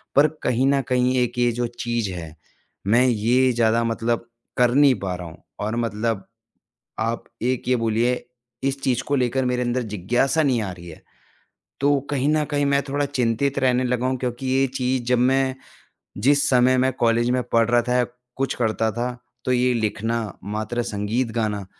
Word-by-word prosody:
पर 145 +2 +6 0.2
कहीं 125 +2 +2
न 140 0 +3
कहीं 125 0 +2
एक 120 0 -4
ये 120 0 +3
जो 120 +1 -2
चीज़ 120 -4 -1
है, 80 -3 -8 0.5
मैं 120 +5 +4
ये 125 +3 +3
ज़्यादा 115 0 +2
मतलब 115 +1 -1 0.3
कर 125 -1 +4
नहीं 140 -2 +6
पा 95 -2 -3
रहा 90 -1 -7
हूँ, 80 0 -14 0.2
और 110 +2 -2
मतलब 115 -3 -2 0.8
आप 115 +1 -1 0.2
एक 125 0 -1
ये 130 - +4
बोलिए, 115 +1 +1 0.5
इस 135 0 -1
चीज़ 125 -2 +1
को 145 - -1
लेकर 130 0 +1
मेरे 125 0 0
अंदर 125 +1 0
जिज्ञासा 120 - 0
नहीं 130 -6 +2
आ 100 - -3
रही 85 -1 -11
है। 80 - -11 0.8
तो 145 +1 +3
कहीं 140 0 0
न 155 0 +2
कहीं 145 -1 +1
मैं 140 0 +2
थोड़ा 145 +1 0
चिंतित 135 0 0
रहने 130 -1 +2
लगा 125 0 0
हूँ, 130 0 0
क्योंकि 125 +1 -4
ये 135 +1 +2
चीज़ 130 0 0
जब 125 -1 +3
मैं 130 +1 +2 0.7
जिस 140 +1 +4
समय 130 0 +4
मैं 130 +1 +2
कॉलेज 120 -1 +2
में 125 0 +1
पढ़ 115 0 +2
रहा 120 0 +4
था 125 - +1
या 125 - +3 0.3
कुछ 135 0 -1
करता 110 -1 0
था, 120 +3 -2 0.4
तो 130 - +1
ये 125 0 +3
लिखना, 115 0 -1 0.2
मात्र 110 +4 -3
संगीत 110 +4 -1
गाना, 105 -3 -1
120 Hz, 185 wpm, -23 LUFS, 115-130 Hz, 0.8 s, पर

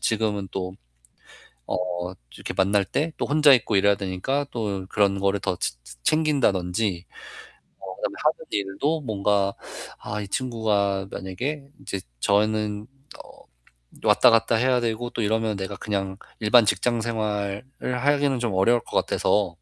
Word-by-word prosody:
지금은 105 -3 0
또 95 -1 -4 0.9
어 - - 0 0.6
이렇게 - - -5
만날 100 +1 +3
때 155 - -1
또 - - -1
혼자 150 -1 +6
있고 110 -4 +1
이래야 100 +1 +5
되니까 100 +9 -2
또 100 -5 -3
그런 100 -1 +2
거를 100 +1 +2
더 90 - -1
치 - - -1
채 - - -11
챙긴다든지 105 - +1 0.7
뭐 95 -1 -8
그다음에 - - -3
하는 - - +1
일도 105 +11 -1
뭔가 100 -4 +1 0.5
아, 105 0 -5
이 100 - -6
친구가 100 -5 0
만약에 135 +10 -4
인제 95 - -5 0.2
저는 105 - +1 0.4
어, - - -17 0.8
왔다 - - +6
갔다 115 0 +3
해야 125 +1 +2
되고 120 +1 -2
또 115 - -3
이러면 110 -1 0
내가 95 +1 -4
그냥 95 -2 -3 0.2
일반 110 +1 +5
직장 115 +4 +1
생활을 105 -2 -2 0.4
하기는 145 -2 +2
좀 120 -4 -1
어려울 115 +5 +4
것 - - -3
같아서 100 -3 +1
105 Hz, 285 characters per minute, -24 LUFS, 100-120 Hz, 0.9 s, 혼자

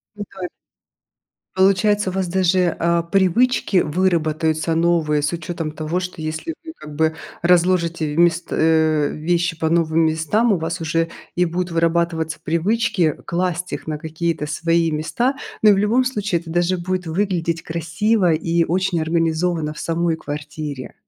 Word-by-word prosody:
Пытай 190 -3 -6 1.1
Получается, 195 +1 +3
у - - -6
вас 190 -1 -1
даже, 180 -1 +2
а, 170 0 +2
привычки 195 +5 +2
выработаются 160 -1 +1
новые 165 -3 +2
с 145 - 0
учётом 165 -1 -4
того, 155 +3 -2
что 180 -3 -5
если 160 - -4
вы 320 - -7
как 150 -1 -10
бы 160 +1 +1 0.3
разложите 170 -3 +2
вмест 170 +1 +3
э, 155 -2 +2
вещи 170 +1 -1
по 160 - 0
новым 165 -1 +2
местам, 160 +9 +1
у 195 - +3
вас 165 +2 -3
уже 165 +1 0 0.3
и 180 - +2
будут 175 +1 -2
вырабатываться 165 -1 0
привычки 180 0 +1
класть 180 0 -2
их - - -5
на 155 -1 -3
какие-то 160 0 -3
свои 165 +2 +1
места. 235 - 0 0.3
Ну, 215 - +7
и - - +7
в - - +3
любом 220 +6 +2
случае 205 -8 -1
это 165 -1 -10
даже 175 +2 +1
будет 180 0 -3
выглядеть 170 -2 -1
красиво 175 +4 +1
и 165 +1 +1
очень 185 0 0
организованно 165 -1 0
в - - -11
самой 165 0 0
квартире. 150 -2 -6
170 Hz, 150 wpm, -20 LUFS, 160-185 Hz, 1.1 s, Ну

